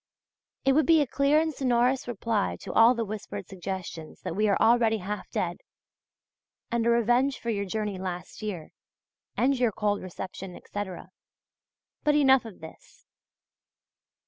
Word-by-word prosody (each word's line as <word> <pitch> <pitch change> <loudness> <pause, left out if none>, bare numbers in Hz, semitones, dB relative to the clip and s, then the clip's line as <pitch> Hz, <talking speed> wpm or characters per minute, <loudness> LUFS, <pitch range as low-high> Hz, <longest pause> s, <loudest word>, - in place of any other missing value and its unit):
It 270 - +5
would 300 0 +3
be 325 -1 +6
a - - +2
clear 280 +3 +3
and 320 0 0
sonorous 255 -1 +1
reply 225 -3 -1
to - - -6
all 230 +2 +6
the 230 -1 -1
whispered 210 0 -6
suggestions 185 -4 -6
that - - -4
we 210 +1 +2
are 200 - +3
already 225 -1 +4
half 205 +1 -5
dead, - - -2 1.1
and 235 -1 +1
a - - +4
revenge 240 +4 +3
for 235 - -3
your 200 -2 -1
journey 205 -1 -3
last 180 0 -6
year, 195 -7 -5 0.7
and 270 +1 +2
your 245 -3 +3
cold 205 0 -1
reception, 185 0 -7
etc. 190 -3 -7 0.9
But 295 0 +3
enough 265 -4 +5
of 210 -7 -11
this. 160 - -14
225 Hz, 150 wpm, -27 LUFS, 195-250 Hz, 1.1 s, be